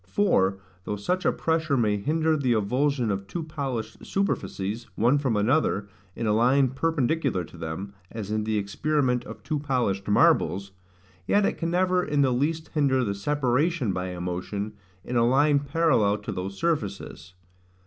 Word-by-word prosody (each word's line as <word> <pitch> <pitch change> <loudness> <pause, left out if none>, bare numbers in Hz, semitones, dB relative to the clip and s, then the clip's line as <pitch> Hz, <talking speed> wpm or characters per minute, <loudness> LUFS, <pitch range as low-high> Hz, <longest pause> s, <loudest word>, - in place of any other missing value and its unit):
For, 95 - +2 0.3
though 105 - -3
such 180 - -2
a - - +4
pressure 160 -3 0
may 105 -4 +2
hinder 155 +9 +1
the 130 -5 +1
avulsion 125 +3 +1
of 100 0 -3
two 170 - -4
polished 130 -8 -5
superficies, 115 - -2
one 120 +6 +3
from 130 -7 0
another, 105 -2 +1 0.3
in 115 - -3
a 105 - +2
line 130 +4 +4
perpendicular 145 - 0
to 80 - -13
them, 85 +4 -6 0.2
as 105 -3 -6
in 110 0 0
the 110 0 0
experiment 125 +5 0
of 110 -1 -10
two 150 +1 -2
polished 125 -9 -1
marbles; 100 -1 +3 0.6
yet 205 0 +3
it - - -1
can 165 - -1
never 180 +1 +2
in 145 -3 +1
the 130 -2 +2
least 155 +5 -1
hinder 135 -4 +2
the 100 -4 -1
separation 130 - 0
by 90 0 -3
a 90 -1 -6
motion, 90 +4 -4 0.3
in 125 - -2
a 115 - +4
line 140 +4 +4
parallel 140 -8 +2
to - - -6
those 95 +2 -5
surfaces. 100 - -3
125 Hz, 170 wpm, -26 LUFS, 100-150 Hz, 0.6 s, a